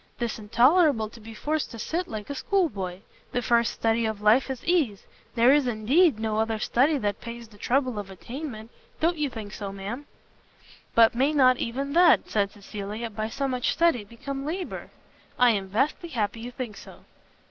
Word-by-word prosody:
'Tis 235 -2 -3
intolerable 245 - +4
to 230 - -14
be 225 +1 -11
forced 300 +7 -2
to 230 - -9
sit 335 +11 -2
like 215 -2 -6
a 285 - -4
school 370 +5 +1
boy. 190 -1 -6 0.3
The 245 - 0
first 235 +1 +3
study 225 0 +1
of 220 -2 -3
life 215 +6 +4
is 260 -2 -5
ease. 300 - +1 0.3
There 240 +3 +6
is, 290 -3 +3
indeed, 245 +7 +3
no 220 -1 -2
other 220 0 0
study 275 +7 +2
that 205 -5 -2
pays 235 0 -8
the 210 -2 -19
trouble 255 -2 0
of 200 -1 -7
attainment. 230 - -8 0.3
Don't 335 0 +1
you 295 -2 0
think 215 -4 -8
so, 200 -2 -5
ma'am?" 205 +9 -6 0.9
"But 230 -1 +6
may 270 +5 +2
not 255 -3 +5
even 275 +5 -3
that," 345 0 +5
said 200 -2 +1
Cecilia, 210 +3 -6
"by 215 +1 -3
so 275 +4 -2
much 250 -2 0
study, 335 -10 +2
become 270 +6 -6
labour?" 350 +5 -5 0.5
"I 245 -1 +6
am 200 -3 -1
vastly 270 - -1
happy 230 -5 -2
you 235 +2 -6
think 245 -4 -6
so." - - -13
235 Hz, 190 wpm, -26 LUFS, 215-280 Hz, 0.9 s, There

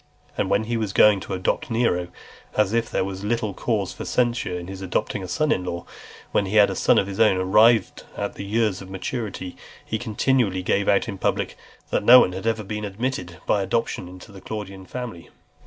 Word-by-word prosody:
And - - -1
when 105 - +2
he 115 +1 -2
was 105 -4 -2
going 105 -2 +6
to 95 - -5
adopt 95 +7 -1
Nero, 110 -7 +1 0.5
as 105 -1 +2
if 115 -1 +1
there - - 0
was 95 0 -6
little 110 -1 -1
cause 105 -2 -1
for - - -7
censure 120 -7 0
in 90 - -6
his 95 +1 -8
adopting 95 +2 -2
a 95 - -6
son 150 - 0
in 90 - +1
law, 85 -1 -5 0.5
when 100 - +1
he 100 - -3
had 105 -1 +6
a - - -4
son - - +3
of - - +3
his 100 0 -6
own 105 -4 +5
arrived 105 +5 +4 0.2
at 100 - -4
years 105 -1 0
of 95 - -10
maturity; 95 -1 -5 0.3
he 110 - -3
continually 110 -4 +1
gave 100 +2 +1
out 100 - +3
in 100 -4 -6
public, - - -1 0.4
"that - - +1
no 125 +4 +10
one 90 - +3
had 95 +4 -5
ever 110 -1 0
been 105 +1 -5
admitted 100 -4 -4
by 100 - +2
adoption 95 -2 -1
into 90 +3 -12
the 95 -1 -12
Claudian 95 -3 -7
family." 120 -9 -7
100 Hz, 210 wpm, -23 LUFS, 95-115 Hz, 0.5 s, no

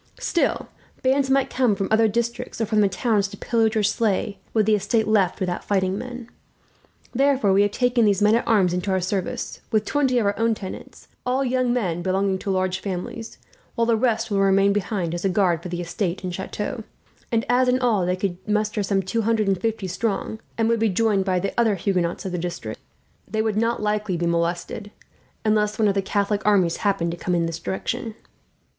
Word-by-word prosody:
Still, 340 - 0 0.4
bands 265 +1 +2
might 270 0 +2
come 250 -5 +2
from 195 0 -2
other 220 0 +5
districts, 235 +2 -3
or 225 - +1
from 215 0 +2
the 200 - +3
towns, 205 +1 +1
to 200 +1 -11
pillage 225 0 +1
or 215 - +2
slay 205 -1 0
were 220 - +3
the 215 +1 +2
estate 210 +2 +1
left 200 -5 +2
without 180 -2 -2
fighting 190 -2 0
men. 245 +2 -7 0.9
Therefore, 265 -6 +3
we 195 - +5
have 205 - +3
taken 245 +2 +2
these 200 -3 +3
men 210 +1 +4
at 230 - +1
arms 190 -6 +3
into 180 +2 -2
our 190 0 +2
service, 185 +1 -3
with 215 -1 +2
twenty 270 -4 +1
of 230 - +2
our 200 - +2
own 230 0 +2
tenants, 190 -3 -9 0.2
all 260 +2 0
young 255 -1 +1
men 185 -9 -1
belonging 190 +1 0
to 200 - -5
large 185 -1 0
families; 195 +4 -5 0.4
while 230 - +2
the 230 0 +3
rest 225 -1 0
will 200 - +1
remain 195 0 +4
behind, 190 -4 -2
as 175 - -4
a 195 - +2
guard 180 -4 +2
for 180 - -7
the 175 0 -3
estate 180 +2 -3
and 180 -1 -3
chateau; 210 +4 -4 0.5
and 230 +1 +1
as 250 +1 +3
in 250 0 +3
all 235 -7 +2
they 180 +1 +1
could 185 -1 -2
muster 210 0 0
some 195 -1 0
two 190 +5 -1
hundred 220 -1 +1
and 195 -2 +1
fifty 225 -3 -1
strong, 210 +3 -2 0.2
and 225 -1 +2
would 230 0 +2
be 225 0 +2
joined 200 -1 +1
by 185 -2 +1
the 195 +2 -2
other 225 -3 +3
Huguenots 180 -2 -1
of 190 - -3
the 180 - -2
district, 165 -11 -5 0.5
they 220 +2 -1
would 220 -2 0
not 230 0 0
likely 210 -3 0
be 170 - -1
molested, 170 +5 -1 0.6
unless 210 -1 +2
one 220 - +3
of 200 - +2
the 195 - +1
Catholic 200 +1 0
armies 190 -5 +3
happened 180 -5 0
to 170 - -6
come 180 +1 -1
in 170 -1 +1
this 165 0 -4
direction. 225 +6 -4
205 Hz, 215 wpm, -23 LUFS, 190-225 Hz, 0.9 s, other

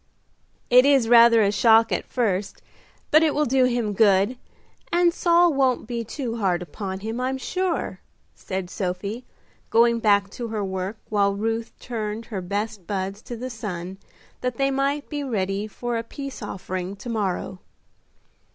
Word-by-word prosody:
"It 250 +1 +8
is 275 -4 +4
rather 230 -1 +7
a 200 - +2
shock 225 +1 +5
at - - -1
first, 205 -5 -2 0.5
but 310 - +7
it 315 -2 +2
will 300 +1 +2
do 260 0 +3
him 240 -4 0
good, 200 +2 +3 0.6
and 345 0 +3
Saul 345 -1 +4
won't 265 -4 +1
be 235 0 -3
too 235 0 -4
hard 180 -5 0
upon 190 +3 -6
him, 225 +4 -4
I'm 260 +1 -1
sure," 365 +5 -2 0.3
said 185 -2 -5
Sophie, 200 +5 -4 0.4
going 235 0 +4
back 200 -3 +3
to 240 - -5
her 215 -2 -3
work, 190 +3 -4
while 200 -2 +2
Ruth 225 +2 -2
turned 220 -2 -4
her 205 -5 -5
best 200 +1 -4
buds 195 +1 -3
to 240 - -7
the 255 +2 -5
sun 190 -4 -6 0.4
that 250 -2 -3
they 275 0 +1
might 275 +2 -1
be 290 -2 -4
ready 200 -4 -2
for 240 +2 -4
a - - -4
peace 275 +3 -8
offering 185 -2 -5
to 200 - -11
morrow. 195 -4 -2
225 Hz, 160 wpm, -24 LUFS, 200-250 Hz, 0.6 s, It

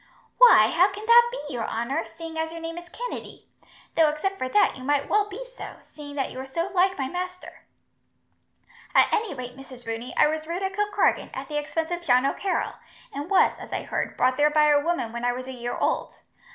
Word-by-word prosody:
"Why, 475 - +8
how 360 +3 +6
can 415 +2 -8
that 475 +1 +7
be, 295 - -6
your 235 -3 -3
honour, 250 +8 -2
seeing 330 0 -9
as 320 0 -2
your 335 - -7
name 330 +1 -5
is 345 0 -15
Kennedy? - - -7 0.5
Though, 320 -2 +5
except 385 +6 -3
for 255 - -2
that, 415 - +3
you 255 - -10
might 285 +1 +1
well 415 0 +2
be 430 +6 -7
so, - - -8
seeing 290 -1 -11
that 270 -2 -2
you 255 - -8
are 265 - -5
so 335 +7 -3
like 375 +1 +2
my 270 -2 -1
master." 365 +3 -7 1.3
"At - - +5
any 425 -8 0
rate, 250 -1 -7
Mrs. 260 -2 -12
Rooney, 225 +2 -5
I - - +6
was 310 +1 -2
reared 350 +3 -3
at 385 0 -2
Kilkargan, 415 0 +1
at - - -6
the 295 - -2
expense 320 +3 -3
of 350 0 -2
John 255 -6 +3
O'Carroll, 380 +7 -1 0.4
and 290 +3 -5
was, 390 - +4
as - - -10
I - - -3
heard, - - -3
brought 255 0 +2
there 295 +1 +4
by 300 0 +4
a 290 -1 +5
woman 335 -9 -1
when 235 0 -5
I 245 0 +2
was 255 +1 -6
a 260 - -7
year 240 -1 -4
old. - - -1
315 Hz, 225 wpm, -25 LUFS, 265-365 Hz, 1.3 s, Why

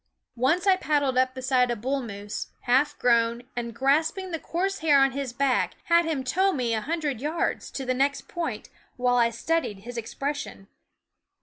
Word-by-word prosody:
Once 270 - +1
I 380 -2 +5
paddled 285 -6 +1
up 255 0 +2
beside 255 -1 +2
a - - +1
young 205 - -12
bull 270 +3 -1
moose, 205 -3 -6
half 275 +4 +2
grown, 235 0 +2
and 235 -1 -3
grasping 310 - +1
the 325 - -2
coarse 385 +5 -2
hair 305 -3 +4
on?. 270 0 +4
his 270 -1 -4
back 260 +1 +1
had 340 0 +4
him 305 -5 -1
tow 375 +10 +2
me 245 -8 -1
a, 220 - 0
hundred 295 -4 -2
yards, 310 +4 -1
to 270 - -5
the 255 - +1
next 275 +2 0
point, 295 -11 -4 0.3
while 245 0 +2
I 235 -1 +4
studied 235 -4 -2
his 240 +3 -8
expression. 255 -3 -5
265 Hz, 185 wpm, -26 LUFS, 240-310 Hz, 0.3 s, I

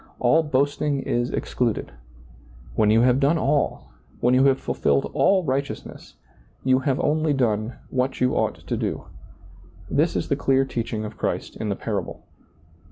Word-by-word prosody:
All 160 - +4
boasting 145 -1 0
is 120 +1 -1
excluded. 120 -4 -2 0.8
When 105 -1 +2
you 110 +2 +5
have 125 +1 +4
done 145 +4 +3
all, 145 -1 0 0.3
when 125 +1 +3
you 130 +1 +5
have 135 -1 +4
fulfilled 70 -1 0
all 190 -1 +3
righteousness, 140 -1 -4 0.5
you 130 0 +3
have 135 0 0
only 155 0 +1
done 115 -3 0 0.2
what 130 +1 -1
you 125 0 +2
ought - - 0
to - - -5
do. - - -3 0.9
This 155 +4 +2
is - - -1
the - - +1
clear 135 -1 +2
teaching 115 -4 -3
of 105 - -9
Christ - - -2
in 110 - -4
the 100 - 0
parable. 100 -5 -4
130 Hz, 160 wpm, -24 LUFS, 115-140 Hz, 0.9 s, you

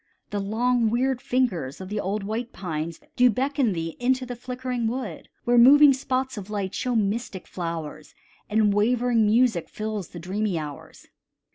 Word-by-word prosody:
The 205 - -1
long, 230 +3 +1
weird 250 +2 0
fingers 190 - -1
of 190 0 -7
the 210 0 -2
old 200 +1 -2
white 225 +4 -3
pines 165 -3 -4 0.2
Do 250 0 +5
beckon 265 -1 +1
thee 165 -1 -4
into 255 +1 +1
the 245 0 -6
flickering 250 -1 -3
wood, 230 -8 -5
Where 240 0 +4
moving 280 +3 +8
spots 265 -1 -2
of 195 0 -10
light 200 -3 -3
show 250 -1 -1
mystic 210 -2 -1
flowers, 165 -3 -6 0.3
And 210 -1 +3
wavering 230 +1 +2
music 225 -5 +2
fills 215 -4 -4
the - - -11
dreamy 190 +2 -2
hours. 150 -2 -8
220 Hz, 160 wpm, -25 LUFS, 190-250 Hz, 0.3 s, moving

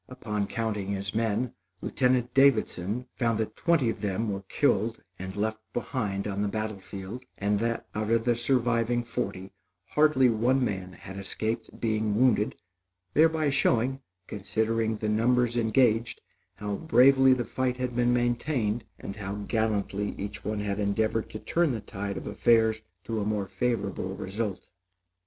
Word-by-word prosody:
Upon 105 -5 -3
counting 110 -4 -2
his 100 0 -3
men, 115 +2 0 0.3
Lieutenant 125 +1 +1
Davidson 125 -4 +2
found 115 -3 +1
that 110 -1 -2
twenty 165 -7 +2
of - - -8
them 105 +2 -1
were 100 0 -3
killed - - +1 0.2
and 95 +1 -6
left 110 +1 -1
behind 105 -5 -2
on 100 0 -2
the 105 - +1
battle 110 0 -3
field; 100 +6 -8
and 100 0 +1
that, 115 +1 -1
out 105 0 -2
of 115 0 +2
the 120 -1 +3
surviving 120 -1 +1
forty, 100 -5 -4 0.4
hardly 150 -4 +4
one 125 +3 +2
man 95 -4 -4
had 95 +1 -10
escaped 110 +3 -4
being 110 -2 0
wounded, 115 -3 +3 0.6
thereby 160 -1 +4
showing, 135 0 +1 0.2
considering 110 +3 -1
the 110 - -3
numbers 120 +2 +2
engaged, 115 0 +2 0.4
how 105 -1 -3
bravely 135 -2 +6
the 120 -2 -1
fight 130 -1 -1
had 125 -1 -3
been 120 0 +3
maintained, 120 -2 0
and 100 - -7
how 100 -1 -4
gallantly 105 -1 -1
each 100 +1 -6
one 105 -1 -2
had 100 0 -2
endeavored 110 +2 0
to - - -6
turn 165 +5 +1
the 115 - -2
tide 100 -1 -5
of - - -6
affairs 110 -2 +3 0.2
to 115 -2 -2
a - - 0
more 105 -1 -1
favorable 100 -2 -2
result. 100 +1 -4
110 Hz, 155 wpm, -28 LUFS, 105-120 Hz, 0.6 s, bravely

